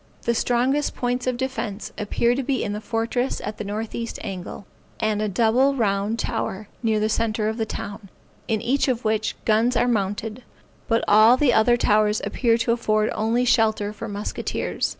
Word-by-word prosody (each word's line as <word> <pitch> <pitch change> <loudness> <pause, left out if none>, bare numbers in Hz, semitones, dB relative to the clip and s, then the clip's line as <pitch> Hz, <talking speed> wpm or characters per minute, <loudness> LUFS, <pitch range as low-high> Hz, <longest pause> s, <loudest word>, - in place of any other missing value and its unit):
The 235 - +1
strongest 255 +5 +1
points 250 +1 -2
of 250 -1 0
defence 240 -5 -4
appear 230 +3 +1
to 265 - -1
be 265 0 -1
in 205 - -2
a 210 - -5
fortress 230 +3 -1
at 215 - -5
the - - -2
northeast 220 +3 -4
angle, 190 +1 -6 0.3
and 215 -1 0
a 215 - 0
double 240 +7 +3
round 205 -2 0
tower, 215 -4 -3
near 220 -3 +1
the 215 - +1
centre 220 -1 0
of 220 +1 -2
the 220 -2 -1
town; 205 -1 -7 0.4
in 220 -2 0
each 270 +5 +1
of 245 -3 -1
which, 215 0 0
guns 225 +3 +3
are 245 - +3
mounted; 215 +1 -1 0.5
but 230 -2 +2
all 220 +4 +7
the 260 -3 +3
other 240 +2 +4
towers 210 -1 +2
appear 230 -3 +2
to 235 0 0
afford 215 -2 +1
only 230 +3 +1
shelter 220 -4 +2
for 210 - -7
musketeers. 205 0 -3
225 Hz, 180 wpm, -23 LUFS, 215-240 Hz, 0.5 s, all